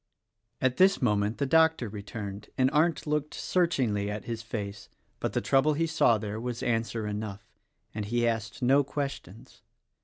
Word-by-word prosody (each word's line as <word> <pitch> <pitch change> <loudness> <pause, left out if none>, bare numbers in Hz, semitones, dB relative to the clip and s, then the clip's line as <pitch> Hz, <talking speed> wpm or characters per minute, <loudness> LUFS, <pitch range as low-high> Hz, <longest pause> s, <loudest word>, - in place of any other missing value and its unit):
At 130 -1 +1
this 195 +1 +5
moment 105 -3 +1
the 140 - 0
doctor 160 -3 +3
returned, 105 0 -7
and 130 0 +3
Arndt 160 +2 +2
looked 150 0 -1
searchingly 125 - +1
at 105 0 -5
his 115 -1 -4
face; 100 -3 -6 0.3
but - - -2
the - - 0
trouble 140 +3 +3
he 165 +2 +1
saw 150 -8 +3
there 105 0 -5
was 120 -1 -4
answer 115 -1 -1
enough, 105 -1 -5 0.5
and 105 -1 -3
he 120 +2 +1
asked 115 0 -3
no 135 +3 +5
questions. 140 -7 -6
115 Hz, 160 wpm, -28 LUFS, 105-140 Hz, 0.5 s, this